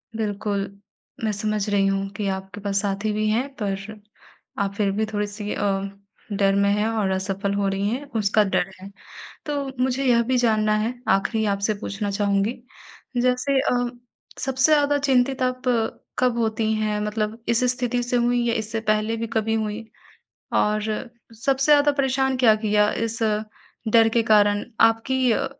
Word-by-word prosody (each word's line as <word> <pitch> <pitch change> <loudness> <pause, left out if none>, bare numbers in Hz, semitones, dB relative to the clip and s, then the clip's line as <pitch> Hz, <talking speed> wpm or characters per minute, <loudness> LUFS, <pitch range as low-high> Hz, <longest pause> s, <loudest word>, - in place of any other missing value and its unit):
बिल्कुल। 205 -2 -2 0.6
मैं 220 - +1
समझ 210 0 -2
रही 200 -1 +2
हूँ 195 0 0
कि 205 - -2
आपके 190 +2 -9
पास 200 -1 0
साथी 200 +1 -1
भी 215 +1 0
हैं 235 +5 +1
पर 200 +1 -4 0.6
आप 200 -1 -1
फिर 200 -1 +1
भी 215 +3 0
थोड़ी-सी 205 0 -3
अ, - - -2 0.7
डर 195 -1 +2
में 200 0 +3
हैं 210 +1 +1
और 220 -3 0
असफल 195 +1 -2
हो 200 -1 0
रही 195 +1 -1
हैं 260 +6 -3
उसका 210 +1 +3
डर 195 -2 0
है। 195 - -9 0.6
तो 290 -2 -2 0.2
मुझे 260 +1 -1
यह 240 -2 +4
भी 260 - +3
जानना 215 -3 +2
है 225 +3 -1 0.2
आखिरी 220 +3 -1
आपसे 200 +2 -1
पूछना 205 -1 -3
चाहूँगी, 200 +2 +1 0.7
जैसे 255 +2 +2
अ, 245 -1 0 0.5
सबसे 265 +3 +2
ज़्यादा 290 -1 +3
चिंतित 265 -1 +2
आप 255 0 -1 0.6
कब 250 -2 +2
होती 220 -1 0
हैं 215 -1 -1
मतलब 210 +1 -2
इस 235 +1 +2
स्थिति 245 -1 -1
से 245 +1 -1
हुईं 240 0 +2
या 230 - +1
इससे 225 0 -3
पहले 215 +1 +1
भी 230 0 -3
कभी 220 0 +1
हुईं? 220 0 -2 0.7
और 210 0 +2 0.6
सबसे 275 +2 +3
ज़्यादा 290 0 +5
परेशान 265 -1 +1
क्या 240 -4 +5
किया 210 0 +3 0.2
इस 230 0 -5 0.7
डर 225 -1 +6
के 230 - +5
कारण 205 -2 +3 0.2
आपकी 235 +3 +3
अ, - - 0
220 Hz, 165 wpm, -23 LUFS, 205-245 Hz, 0.7 s, डर